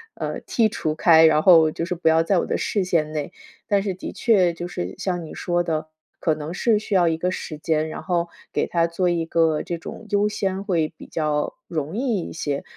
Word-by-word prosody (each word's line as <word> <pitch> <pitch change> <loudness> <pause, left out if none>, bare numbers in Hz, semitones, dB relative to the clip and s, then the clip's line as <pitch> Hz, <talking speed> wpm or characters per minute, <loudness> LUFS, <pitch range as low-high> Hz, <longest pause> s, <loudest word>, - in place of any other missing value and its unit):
呃， - - -4
剔 225 -2 +2
除 155 -7 -2
开， 160 -1 +6
然 155 -1 +3
后 165 -4 +7
就 165 +2 -3
是 180 - -2
不 165 -2 +1
要 160 +1 +4
在 185 +1 +2
我 - - -1
的 - - 0
视 200 -3 -1
线 160 -4 0
内。 150 +2 -4 0.4
但 200 -2 +2
是 195 -3 -2
的 180 - -7
确， 190 -7 +3
就 175 +1 -6
是 90 - -5
像 180 -3 -2
你 155 - -9
说 175 0 0
的， 155 -2 -2 0.3
可 160 -2 +1
能 155 +2 -6
是 220 +4 +2
需 210 -1 -5
要 175 -3 +4
一 160 -1 +1
个 180 +2 -1
时 155 -4 -5
间， 155 0 0
然 - - -7
后 175 -2 0 0.3
给 - - 0
它 170 -1 +2
做 175 +2 0
一 170 -1 0
个 160 -2 +1
这 170 - -4
种 225 - -9
优 205 0 +2
先， 195 -1 -2
会 170 -6 0
比 - - -11
较 150 -2 -1
容 155 +2 -3
易 240 -6 0
一 - - -7
些。 145 -3 -3
170 Hz, 250 characters per minute, -23 LUFS, 160-185 Hz, 0.4 s, 后